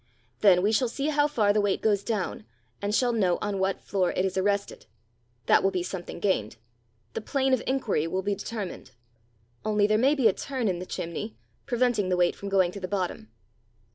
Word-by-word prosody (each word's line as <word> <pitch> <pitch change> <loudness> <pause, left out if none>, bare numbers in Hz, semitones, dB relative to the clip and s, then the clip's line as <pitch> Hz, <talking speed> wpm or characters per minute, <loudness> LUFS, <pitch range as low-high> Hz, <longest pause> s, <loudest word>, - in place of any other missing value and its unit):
Then 185 -3 +5
we 210 - +3
shall 245 +3 +2
see 275 +5 -2
how 295 -1 +3
far 215 -9 +2
the 210 - +3
weight 205 -1 +1
goes 205 -2 +1
down, 205 - -2 0.4
and 205 +1 0
shall 245 0 +2
know 190 -6 +2
on 205 -2 -2
what 190 0 0
floor 185 -3 0
it 185 - 0
is 190 - -2
arrested. 200 +1 -1 0.6
That - - +5
will 195 - +3
be 185 -2 -2
something 180 -1 -6
gained: 170 - 0 0.6
the - - -3
plane 265 +3 0
of 255 - +2
inquiry 235 - 0
will 190 +3 -2
be 205 +1 0
determined. 200 - -6 0.7
Only 210 -1 +2
there 215 +1 +3
may 275 +5 +4
be 260 -6 +4
a 205 - +3
turn 260 -1 -3
in 180 -3 0
the 180 - -7
chimney, 170 +6 -5 0.3
preventing 240 -6 +1
the 180 - +1
weight 175 -1 +3
from 200 - -6
going 190 -3 +3
to 200 - -7
the 185 - -4
bottom." 180 - -3
205 Hz, 205 wpm, -27 LUFS, 185-230 Hz, 0.7 s, Then